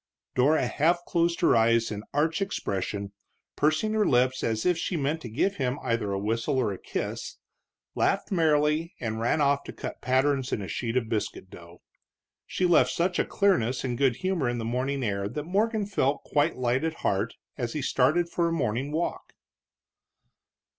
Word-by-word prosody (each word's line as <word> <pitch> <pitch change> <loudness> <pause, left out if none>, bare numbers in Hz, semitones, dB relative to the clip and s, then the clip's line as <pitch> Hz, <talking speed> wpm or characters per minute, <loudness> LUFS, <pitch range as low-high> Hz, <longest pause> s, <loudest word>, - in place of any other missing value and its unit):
Dora 140 +3 +3
half 170 +7 +1
closed 170 0 0
her 170 - +5
eyes 115 0 +3
in 105 -1 -4
arch 160 +5 +1
expression, 100 - -3 0.4
pursing 155 +9 +1
her 215 -1 +3
lips 130 0 +2
as 110 -1 -1
if 180 - +4
she 170 +1 -2
meant 150 +2 -1
to 120 - -7
give 190 - 0
him 130 -1 -1
either 115 -4 -1
a 100 - -1
whistle 115 +6 -1
or 115 -6 +1
a 95 - -8
kiss, - - -5 0.6
laughed - - 0
merrily, 155 -1 +2
and 110 -2 -3
ran 120 +7 +1
off 140 0 +2
to - - -6
cut - - -7
patterns 135 +1 +1
in - - 0
a 100 - -5
sheet 120 +4 -2
of 120 -3 0
biscuit 105 -4 -3
dough. 85 0 -14 0.6
She 185 - -1
left 175 -1 +5
such 180 +1 0
a - - +2
clearness 130 - +1
and 125 -2 -2
good 130 -1 +2
humor 180 -7 -1
in 120 - -2
the 115 - -3
morning 130 +3 -1
air 100 -2 -1
that 150 +6 -4
Morgan 210 +5 0
felt 150 -8 0
quite 150 +3 +1
light 125 +2 0
at 160 0 -3
heart 100 +4 0 0.2
as 120 -3 -3
he 150 - -3
started 145 +8 +2
for 170 0 0
a - - -1
morning 135 -3 -1
walk. 160 +3 -3
135 Hz, 185 wpm, -27 LUFS, 115-165 Hz, 0.6 s, her